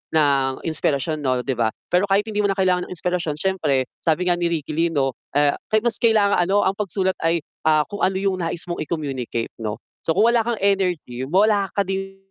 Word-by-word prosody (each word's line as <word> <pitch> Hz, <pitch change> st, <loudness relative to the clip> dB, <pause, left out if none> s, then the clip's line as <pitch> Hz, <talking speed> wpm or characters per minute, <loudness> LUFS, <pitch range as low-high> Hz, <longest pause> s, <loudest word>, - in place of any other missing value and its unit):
ng 135 Hz, -3 st, +2 dB
inspirasyon 155 Hz, -1 st, 0 dB
'no 130 Hz, -2 st, +1 dB
'di 135 Hz, -, 0 dB
ba? 115 Hz, -1 st, +1 dB, 0.2 s
Pero 185 Hz, +3 st, +3 dB
kahit 200 Hz, +1 st, +3 dB
hindi 210 Hz, -1 st, -1 dB
mo 200 Hz, -, +2 dB
na 195 Hz, -, -3 dB
kailangan 185 Hz, -2 st, +1 dB
ng -, -, -5 dB
inspirasyon 175 Hz, -4 st, -2 dB
siyempre 155 Hz, -8 st, +1 dB, 0.2 s
sabi 165 Hz, +2 st, +1 dB
nga 175 Hz, -, +4 dB
ni 175 Hz, -1 st, 0 dB
Ricky 155 Hz, -3 st, -3 dB
Lee 165 Hz, +2 st, +2 dB
'no, 135 Hz, -4 st, 0 dB, 0.2 s
ah, 145 Hz, -1 st, +3 dB, 0.2 s
ka 215 Hz, -, +4 dB
mas 235 Hz, -3 st, +1 dB
kailangan 215 Hz, -4 st, +4 dB
ano 195 Hz, +4 st, +2 dB
"Ang 190 Hz, -, +1 dB
pagsulat 190 Hz, -2 st, 0 dB
ay, 165 Hz, +1 st, +2 dB, 0.3 s
ah, 155 Hz, -1 st, +4 dB
kung 205 Hz, -, -7 dB
ano 190 Hz, 0 st, +2 dB
'yung 190 Hz, -2 st, -1 dB
nais 170 Hz, +1 st, -2 dB
mong 175 Hz, -2 st, -3 dB
i-communicate." 135 Hz, -8 st, -4 dB
'no. 105 Hz, -1 st, -3 dB, 0.3 s
So 165 Hz, -, +1 dB
kung 220 Hz, +3 st, +5 dB
wala 235 Hz, -, +4 dB
kang 235 Hz, -1 st, -2 dB
energy, 180 Hz, -10 st, 0 dB
wala 200 Hz, +2 st, +3 dB
ka 200 Hz, -, +4 dB
din 195 Hz, 0 st, -4 dB
175 Hz, 215 wpm, -22 LUFS, 150-195 Hz, 0.3 s, kung